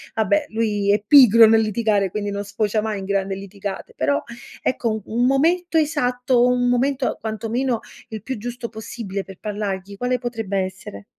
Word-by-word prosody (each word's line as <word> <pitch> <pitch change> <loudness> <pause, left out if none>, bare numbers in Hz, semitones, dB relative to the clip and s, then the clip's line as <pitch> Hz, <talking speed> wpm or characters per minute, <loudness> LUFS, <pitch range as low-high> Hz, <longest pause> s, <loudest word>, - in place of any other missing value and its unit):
vabbè, 295 +7 +1
lui 210 -3 0
è 205 - +2
pigro 230 -5 +9
nel 225 0 +5
litigare, 215 -2 +1
quindi 205 +2 -3
non 200 0 -3
sfocia 205 +1 -1
mai 215 -2 -3
in 190 - -6
grande 195 0 -1
litigate 195 0 -7
però, 140 +2 +1 0.4
ecco, 245 -2 0 0.2
u - - -9
un 240 +2 +2
momento 330 +6 +2
esatto, 250 -5 +2
un 250 0 +2
momento, 260 +2 0
quantomeno, 225 +3 -2 0.3
il 220 -2 -7
più 260 +1 -4
giusto 240 +2 -6
possibile 215 -3 -6
per 190 -1 -12
parlargli, 200 -2 -4
quale 250 +3 0
potrebbe 225 -5 -4
essere? 185 - -5
220 Hz, 165 wpm, -21 LUFS, 200-245 Hz, 0.4 s, pigro